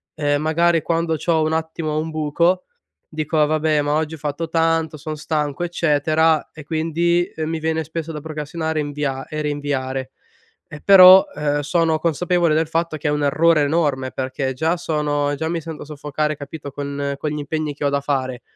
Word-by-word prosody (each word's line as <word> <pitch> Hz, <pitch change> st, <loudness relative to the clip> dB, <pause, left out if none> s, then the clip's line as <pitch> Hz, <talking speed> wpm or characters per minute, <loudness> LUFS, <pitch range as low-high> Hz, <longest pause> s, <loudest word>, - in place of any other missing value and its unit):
ehm, 145 Hz, -1 st, 0 dB
magari 165 Hz, +1 st, +2 dB
quando 165 Hz, -1 st, 0 dB
c'ho 160 Hz, 0 st, +1 dB
un 155 Hz, 0 st, 0 dB
attimo 160 Hz, -1 st, -2 dB
un 160 Hz, -, -3 dB
buco, 170 Hz, +4 st, +1 dB, 0.5 s
dico: 155 Hz, 0 st, +1 dB
"Vabbè, 155 Hz, 0 st, +1 dB
ma 145 Hz, 0 st, 0 dB
oggi 155 Hz, +1 st, -1 dB
ho -, -, -12 dB
fatto 150 Hz, +3 st, -3 dB
tanto, 165 Hz, -1 st, +1 dB
sono 155 Hz, +1 st, -5 dB
stanco, 150 Hz, 0 st, -2 dB
eccetera" 160 Hz, -1 st, +1 dB
e, 155 Hz, -, -11 dB
quindi, 170 Hz, +2 st, 0 dB
mi 160 Hz, +1 st, -2 dB
viene 160 Hz, 0 st, -1 dB
spesso 160 Hz, +1 st, -5 dB
da 155 Hz, -, -5 dB
procrastinare 160 Hz, +1 st, -3 dB
e -, -, 0 dB
invia 145 Hz, -2 st, -3 dB
e 155 Hz, 0 st, -4 dB
rinviare. 135 Hz, -3 st, -3 dB, 0.6 s
Ehm, 150 Hz, -, -10 dB
però, 190 Hz, -1 st, +9 dB
ehm, 145 Hz, -1 st, 0 dB
sono 160 Hz, +2 st, +1 dB
consapevole 170 Hz, +1 st, +1 dB
del 160 Hz, 0 st, +1 dB
fatto 165 Hz, 0 st, -1 dB
che 150 Hz, -, -2 dB
è -, -, +2 dB
un 150 Hz, 0 st, 0 dB
errore 155 Hz, +2 st, +3 dB
enorme 145 Hz, -4 st, 0 dB
perché 130 Hz, 0 st, -3 dB
già 160 Hz, +6 st, 0 dB
sono 145 Hz, -3 st, -1 dB
già 160 Hz, +3 st, -2 dB
mi 170 Hz, 0 st, -2 dB
sento 160 Hz, -1 st, -7 dB
soffocare, 150 Hz, +1 st, -3 dB
capito, 145 Hz, 0 st, -8 dB
con 140 Hz, 0 st, -3 dB
con 150 Hz, -, -2 dB
gli 150 Hz, -, -3 dB
impegni 150 Hz, +1 st, -3 dB
che 145 Hz, -, -5 dB
ho -, -, +2 dB
da 140 Hz, 0 st, 0 dB
fare, 130 Hz, -3 st, -2 dB
155 Hz, 185 wpm, -21 LUFS, 145-165 Hz, 0.6 s, però